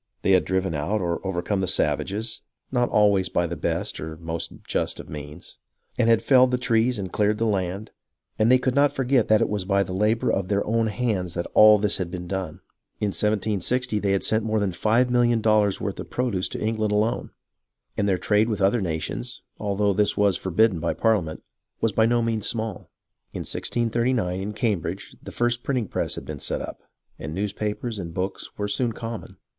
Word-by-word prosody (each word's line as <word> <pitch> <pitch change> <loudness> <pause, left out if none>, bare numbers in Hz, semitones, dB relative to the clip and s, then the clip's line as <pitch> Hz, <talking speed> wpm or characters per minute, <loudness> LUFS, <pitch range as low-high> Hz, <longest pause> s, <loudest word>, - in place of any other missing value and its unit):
They - - +3
had 95 - +4
driven 95 -2 0
out 80 +9 -1
or 85 -3 -2
overcome 95 +1 -1
the 95 - -1
savages 100 +7 -1 0.3
(not 125 -2 +1
always 100 -3 +3
by 85 - +1
the 85 0 -4
best - - -2
or 80 +1 -6
most 80 0 -3
just - - -2
of - - -9
means), 75 +2 -9 0.4
and 115 -2 +2
had 115 -1 +4
felled 130 +1 +5
the 125 - +1
trees 120 0 +1
and 95 -3 -5
cleared 105 0 +2
the 115 - 0
land, 100 0 -2 0.5
and 110 +3 +4
they 130 - +7
could 130 0 0
not 140 +1 +4
forget 130 -2 +1
that 110 0 +4
it - - +3
was 105 -2 -2
by 100 +1 +2
the 90 - -6
labour 105 +4 +1
of 95 -1 -1
their 100 0 0
own 115 +1 +1
hands 105 -6 -2
that 85 - -2
all 105 0 +8
this 105 0 0
had 90 -3 -3
been 90 0 -6
done. 95 -4 -4 0.4
In 105 - 0
1760 105 +3 0
they 100 -1 +1
had 100 - 0
sent 110 0 +1
more 110 0 0
than 100 -2 0
five 115 +7 +2
millions 120 -1 +3
of - - -13
dollars' 105 -3 +3
worth - - -4
of - - -7
produce 120 -8 -1
to - - -5
England 110 -1 0
alone; 105 +2 0 0.7
and 100 -1 +1
their 95 - +2
trade 105 +4 +2
with 105 -3 -1
other 100 +4 +3
nations, 80 -8 -4 0.2
although 100 0 +1
this 105 +2 +1
was 100 -2 +3
forbidden 95 0 +2
by 85 +1 -1
Parliament, 100 -9 0 0.4
was 115 - +1
by 110 +3 +3
no 120 0 +2
means 115 -2 0
small. 110 -4 -4 0.4
In - - -4
1639, 120 -5 0
in 105 +2 -4
Cambridge, 105 -5 -2
the - - -9
first 120 0 0
printing 125 -6 -1
press - - -2
had - - -7
been - - -6
set - - -2
up, - - -8 0.4
and 75 +3 -5
newspapers 105 +3 -3
and 85 -3 -6
books 95 +1 -4
were 105 - -2
soon 115 +3 0
common. 115 0 -7
105 Hz, 205 wpm, -24 LUFS, 95-115 Hz, 0.7 s, all